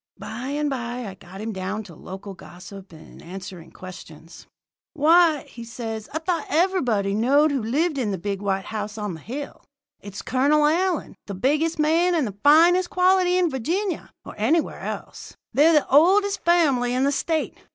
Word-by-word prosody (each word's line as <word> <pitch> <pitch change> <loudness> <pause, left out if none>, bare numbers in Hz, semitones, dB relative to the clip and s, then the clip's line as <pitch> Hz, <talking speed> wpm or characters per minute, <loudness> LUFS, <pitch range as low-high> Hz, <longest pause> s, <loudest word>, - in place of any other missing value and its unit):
"By 235 +4 -7
and 295 +2 -1
by 245 -2 -4
I 195 - -7
got 190 +1 -12
him 220 0 -4
down 190 +3 -4
to 185 -5 -13
local 195 +5 -9
gossip 190 +1 -12
and 160 -1 -14
answering 185 -1 -9
questions. 170 -3 -12 0.5
"'Why,' 320 0 +4 0.2
says 225 -2 -6
he, - - -24
'I - - 0
thought 330 -3 -1
everybody 265 - +1
knowed 280 +8 +3
who 275 -3 -1
lived 285 +7 0
in 235 -5 -1
the 195 - -2
big 200 +2 -4
white 195 -1 -1
house 210 0 -5
on 210 -3 -4
the 160 - -9
hill. 275 - -7 0.4
It's 200 -1 -9
Colonel 290 +4 +2
Allyn, 345 +2 0
the 200 - -5
biggest 305 - 0
man 330 +4 +2
and 310 -5 +1
the 200 -2 -7
finest 345 +5 +5
quality 365 0 +3
in 355 -3 +2
Virginia, 340 - -2 0.2
or - - -9
anywhere 300 +10 +1
else. - - -7 0.2
They're 305 +4 +5
the 300 - +3
oldest 390 +8 +3
family 275 -8 +2
in 255 - +1
the 280 - +2
State. 315 +3 -2
265 Hz, 175 wpm, -23 LUFS, 200-325 Hz, 0.5 s, finest